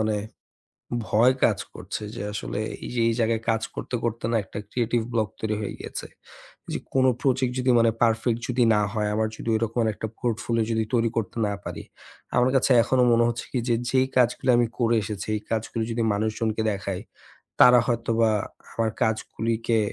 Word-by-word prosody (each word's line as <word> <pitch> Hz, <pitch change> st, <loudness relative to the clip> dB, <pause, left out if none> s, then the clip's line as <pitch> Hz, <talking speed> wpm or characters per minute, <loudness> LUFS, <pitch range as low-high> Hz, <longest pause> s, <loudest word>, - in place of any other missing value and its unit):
মানে 110 Hz, -1 st, +1 dB, 0.9 s
ভয় 120 Hz, +6 st, +5 dB
কাজ -, -, +3 dB, 0.2 s
করছে -, -, -6 dB
যে -, -, -5 dB
আসলে 105 Hz, 0 st, -4 dB, 0.2 s
এই -, -, -6 dB
যে 120 Hz, -, 0 dB
এই 115 Hz, -, +1 dB
জায়গায় 115 Hz, 0 st, +1 dB
কাজ 110 Hz, 0 st, 0 dB
করতে, -, -, -6 dB
করতে 115 Hz, -1 st, -2 dB
না 115 Hz, -, +2 dB
একটা 100 Hz, -, -8 dB
creative 120 Hz, -1 st, 0 dB
block 110 Hz, -3 st, 0 dB
তৈরি 110 Hz, -1 st, -1 dB
হয়ে 105 Hz, -, -3 dB
গিয়েছে। -, -, -6 dB, 0.7 s
যে -, -, -1 dB
কোন 130 Hz, -1 st, +3 dB, 0.2 s
project 130 Hz, -2 st, +1 dB
যদি 125 Hz, 0 st, +3 dB
মানে 115 Hz, 0 st, +4 dB
perfect 115 Hz, 0 st, +2 dB
যদি 125 Hz, 0 st, +2 dB
না 105 Hz, -, +3 dB
হয়, 105 Hz, -2 st, 0 dB
আমার 110 Hz, 0 st, +1 dB
যদি 115 Hz, -, -4 dB
ওইরকম 115 Hz, +2 st, -1 dB
এর 110 Hz, -, +2 dB
একটা 110 Hz, -, -4 dB
portfolio 115 Hz, -1 st, 0 dB
যদি 110 Hz, 0 st, +1 dB
তৈরি 115 Hz, -1 st, +3 dB
করতে 115 Hz, +1 st, -2 dB
না 100 Hz, -, -1 dB
পারি, -, -, -6 dB, 0.5 s
আমার 125 Hz, +1 st, +4 dB
কাছে 130 Hz, 0 st, +3 dB
এখনও 130 Hz, -1 st, +3 dB
মনে 115 Hz, 0 st, +4 dB
হচ্ছে 120 Hz, 0 st, -4 dB
কি 125 Hz, -, 0 dB
যে 120 Hz, -, +4 dB
যেই 130 Hz, 0 st, +3 dB
কাজগুলি 125 Hz, +1 st, +2 dB
আমি 120 Hz, -, +3 dB
করে 115 Hz, -1 st, +3 dB
এসেছি 105 Hz, -2 st, -5 dB
এই 105 Hz, -, -3 dB
কাজগুলি 115 Hz, 0 st, -1 dB
যদি 115 Hz, 0 st, 0 dB
মানুষজনকে 110 Hz, +1 st, -1 dB
দেখাই, 100 Hz, -2 st, -3 dB, 0.6 s
তারা 125 Hz, 0 st, +9 dB
হয়তোবা 115 Hz, -2 st, +1 dB, 0.4 s
আমার 115 Hz, -1 st, 0 dB
কাজগুলিকে 115 Hz, +1 st, 0 dB
115 Hz, 185 wpm, -25 LUFS, 110-120 Hz, 0.9 s, তারা